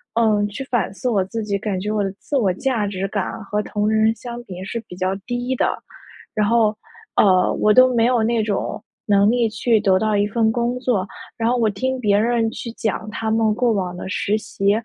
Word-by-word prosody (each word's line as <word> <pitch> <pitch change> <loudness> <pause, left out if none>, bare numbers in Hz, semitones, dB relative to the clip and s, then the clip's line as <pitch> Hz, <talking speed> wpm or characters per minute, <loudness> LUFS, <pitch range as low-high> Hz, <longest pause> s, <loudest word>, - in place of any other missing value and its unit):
嗯， 215 -3 +3
去 210 +6 -6
反 240 -6 -1
思 250 - -4
我 205 -6 +2
自 225 +3 -4
己， 205 -1 -2
感 195 -2 -2
觉 210 +3 -3
我 210 -1 0
的 195 - -2
自 290 - -4
我 210 -8 +3
价 225 0 -1
值 195 -1 -3
感 200 -2 -2
和 210 +1 -1
同 210 0 -2
龄 220 - +1
人 220 +1 +3
相 240 0 -8
比 185 -6 -9
是 230 +4 -4
比 180 - -9
较 185 +1 0
低 245 +1 -2
的， - - +1 0.6
然 210 -1 +1
后， 220 -1 +3 0.4
呃， 185 -3 +4
我 210 - +2
都 255 +2 +6
没 230 -1 +3
有 245 -2 +2
那 230 0 +1
种 210 -2 -3 0.2
能 200 0 +4
力 240 -1 +2
去 225 +1 +1
得 195 -3 +3
到 215 0 +1
一 205 0 +2
份 220 +1 +1
工 240 +2 -1
作， 220 -7 0 0.3
然 230 0 +1
后 245 - +2
我 225 -2 +2
听 260 +6 -2
别 205 -4 +2
人 230 +1 +2
去 235 - -6
讲， 215 -2 -3
他 220 0 -2
们 220 -1 +2
过 245 0 +2
往 185 -3 -2
的 180 - -6
实 205 +1 0
习 200 -2 -1
220 Hz, 245 characters per minute, -21 LUFS, 200-235 Hz, 0.6 s, 都